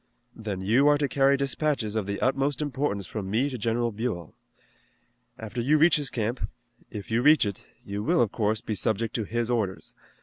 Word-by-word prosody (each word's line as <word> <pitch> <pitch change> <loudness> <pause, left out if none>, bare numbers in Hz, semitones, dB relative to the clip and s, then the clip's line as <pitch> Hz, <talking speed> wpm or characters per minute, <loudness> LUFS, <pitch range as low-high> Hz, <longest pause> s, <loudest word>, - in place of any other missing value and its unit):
"Then 105 -4 -5
you 115 +9 +3
are 145 0 +5
to 145 -1 0
carry 140 +1 +3
dispatches 140 -5 -1
of 105 -3 -1
the 100 0 -3
utmost 135 +2 +1
importance 140 -9 -2
from 95 +1 -5
me 125 +8 +1
to 130 - -4
General 115 +2 0
Buell. 105 -7 -4 1.0
After 115 +2 -5
you 145 +6 +3
reach 160 +1 +5
his 145 -3 -1
camp 115 +2 -2 0.4
if 105 -1 -8
you 115 +2 +2
reach 150 -1 +6
it 100 -2 -5 0.2
you 100 +1 -4
will, 115 - +3
of 105 - -2
course, 110 -1 0
be 110 - -3
subject 110 +1 -1
to 115 - -1
his 120 +2 -1
orders. 105 -6 -2
115 Hz, 195 wpm, -27 LUFS, 105-135 Hz, 1.0 s, reach